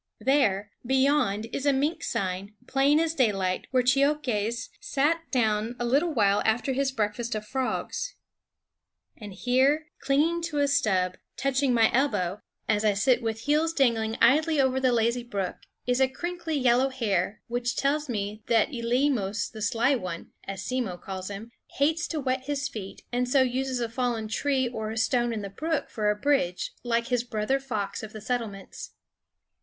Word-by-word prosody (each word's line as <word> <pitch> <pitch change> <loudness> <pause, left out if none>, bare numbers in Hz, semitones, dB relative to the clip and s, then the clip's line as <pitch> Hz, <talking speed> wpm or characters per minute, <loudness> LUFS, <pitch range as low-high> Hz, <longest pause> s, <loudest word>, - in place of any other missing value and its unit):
There, 210 -8 +2
beyond, 265 -5 +2
is 280 - -2
a - - +6
mink 285 +5 0
sign, 195 +2 -3
plain 280 +3 +3
as 325 0 +1
daylight, 195 - 0
where 255 -1 +2
Cheokhes 250 -4 +1
sat 325 +4 0
down 220 -2 +1
a 240 - -1
little 285 +8 +2
while 205 -7 +3
after 230 +5 +1
his 270 +1 0
breakfast 225 0 -2
of 215 0 -4
frogs. 270 - -3 1.0
And 210 -3 -9
here, 265 +9 +1
clinging 310 +5 +2
to 320 -3 -4
a 285 0 +3
stub, 190 -10 +1 0.2
touching 275 0 +1
my 230 -2 +4
elbow 210 -8 +1 0.3
as 210 -1 +2
I 210 -2 +3
sit 245 +5 +3
with 225 -1 -3
heels 305 +5 +1
dangling 225 -6 +1
idly 305 +5 +4
over 265 -1 +3
the 260 -1 +3
lazy 235 +1 +1
brook, 200 -6 -3 0.3
is 250 +1 +1
a 265 - +6
crinkly 340 +3 -4
yellow 255 0 +3
hair, 210 -6 -1
which 245 +1 -1
tells 295 +1 0
me 210 -1 -3
that 230 +2 +3
Eleemos 235 -4 0
the 220 - -9
Sly 230 +6 +2
One, 180 -9 -4
as 195 -1 -5
Simmo 245 -8 -2
calls 190 +1 -6
him, 210 +3 -7 0.3
hates 315 +4 +2
to 320 - -3
wet 260 -1 -1
his 285 -1 -1
feet 215 -8 -8
and 250 0 0
so 265 0 +5
uses 260 0 -1
a 235 - -1
fallen 230 -2 -2
tree 260 +3 0
or 220 -3 -4
a 220 - -5
stone 240 +1 +2
in 215 -3 -3
the 200 - -5
brook 315 +7 -2
for 210 -2 0
a 210 - +2
bridge, 210 -7 0
like 235 0 0
his 245 -2 +1
brother 240 +2 -1
fox 215 -7 -3
of 220 -1 -8
the 215 - -8
settlements. 215 -4 -4
245 Hz, 170 wpm, -27 LUFS, 215-275 Hz, 1.0 s, a